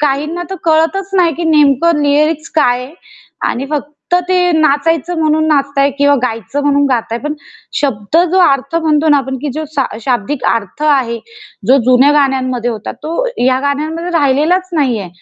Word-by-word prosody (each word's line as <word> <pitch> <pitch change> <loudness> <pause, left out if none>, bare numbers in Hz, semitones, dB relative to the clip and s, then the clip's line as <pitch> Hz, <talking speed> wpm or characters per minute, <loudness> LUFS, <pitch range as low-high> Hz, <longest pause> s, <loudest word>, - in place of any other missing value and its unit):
काहींना 300 +4 -1
तर 385 - -4
कळतच 330 +5 +1
नाही 345 -3 +3
की 340 - -4
नेमकं 300 0 +3
लिरिक्स 305 +2 +1
काय 250 -4 +2
आहे 280 - -13 0.6
आणि 260 +3 -4
फक्त 295 0 -3 0.4
ते 370 - +2 0.2
नाचायचं 320 +2 +1
म्हणून 315 0 +1
नाचताये 280 -1 +1
किंवा 285 0 +4
गायचं 250 +4 -3
म्हणून 285 0 +2
गाताये 235 -3 -2
पण 300 +1 -3 0.5
शब्द 245 -2 -1
जो 375 - +2
अर्थ 275 0 +1
म्हणतो 315 -1 +1
ना 295 - +5
आपण 265 -1 -4
की 295 - -2
जो 315 - -3
शा 275 - +2 0.2
शाब्दिक 250 +3 -2
अर्थ 230 +5 -4
आहे, 260 -6 +1 0.5
जो 265 - +5
जुन्या 255 +3 +5
गाण्यांमध्ये 255 -4 0
होता, 220 -2 -6
तो 335 +11 -4 0.2
या 260 0 +2
गाण्यांमध्ये 310 +5 -2
राहिलेलाच 310 +7 +1
नाहीये. 245 - 0
290 Hz, 160 wpm, -14 LUFS, 265-315 Hz, 0.6 s, ना